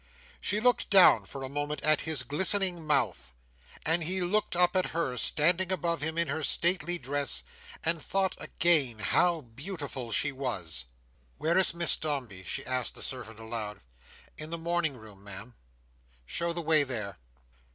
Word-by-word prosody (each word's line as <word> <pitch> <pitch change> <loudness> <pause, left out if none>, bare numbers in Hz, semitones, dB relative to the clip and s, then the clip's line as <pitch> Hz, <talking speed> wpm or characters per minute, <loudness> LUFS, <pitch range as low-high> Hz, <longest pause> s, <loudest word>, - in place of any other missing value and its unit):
She 205 - 0
looked 245 +2 +2
down 195 -3 +7
for 135 -1 -7
a - - -3
moment 145 +1 -4
at 155 0 +4
his 150 -5 0
glistening 175 +3 +1
mouth; 115 - 0 0.5
and 165 +2 +3
he 185 +4 +1
looked 185 +2 0
up 180 +1 +3
at 185 - +2
her, 130 -7 -1
standing 170 +9 +2
above 170 -4 0
him 160 +2 -2
in 170 -1 +2
her 150 +3 -3
stately 175 +3 +2
dress, 140 0 -1 0.4
and 165 0 +2
thought, 190 +2 0
again, 150 -9 +3
how 165 - +2
beautiful 140 - -7
she 145 +6 +1
was. 95 - -3 0.5
"Where 165 +2 0
is 185 -2 +2
Miss 170 0 +6
Dombey?" 130 - -4
she 135 +9 -4
asked 130 -1 -2
the - - -6
servant, 115 -4 -6
aloud. 110 -2 -5 0.6
"In 155 0 -6
the 170 - -4
morning 165 -4 -1
room, 105 -3 -14
Ma'am." 100 +4 -6 0.7
"Show 170 - -2
the 170 0 -3
way 160 -1 +5
there!" 110 - -3
150 Hz, 160 wpm, -29 LUFS, 125-175 Hz, 0.7 s, down